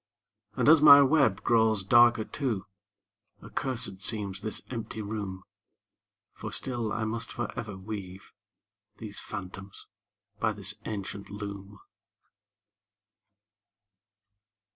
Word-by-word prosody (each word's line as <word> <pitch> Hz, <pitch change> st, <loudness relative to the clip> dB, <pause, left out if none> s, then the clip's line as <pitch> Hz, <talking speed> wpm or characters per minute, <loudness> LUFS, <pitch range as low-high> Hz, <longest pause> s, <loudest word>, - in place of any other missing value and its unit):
And -, -, 0 dB
as 155 Hz, 0 st, +7 dB
my 140 Hz, -2 st, +10 dB
web 135 Hz, -8 st, +2 dB
grows 110 Hz, -3 st, +3 dB
darker 120 Hz, +1 st, +5 dB
too, 120 Hz, -9 st, -3 dB, 0.8 s
Accursed 120 Hz, -7 st, -3 dB
seems 105 Hz, -2 st, +2 dB
this 110 Hz, -, -5 dB
empty 115 Hz, -2 st, -6 dB
room; 100 Hz, -3 st, -5 dB, 0.9 s
For -, -, -8 dB
still 120 Hz, -4 st, -2 dB
I 110 Hz, -, -2 dB
must 110 Hz, +1 st, -4 dB
forever 115 Hz, -3 st, -5 dB
weave 95 Hz, -1 st, -8 dB, 0.6 s
These 105 Hz, -2 st, -4 dB
phantoms 100 Hz, -1 st, -8 dB, 0.5 s
by 110 Hz, -2 st, +1 dB
this 100 Hz, -1 st, 0 dB
ancient 100 Hz, -1 st, -6 dB
loom. 100 Hz, -1 st, -8 dB
110 Hz, 100 wpm, -28 LUFS, 100-120 Hz, 0.9 s, my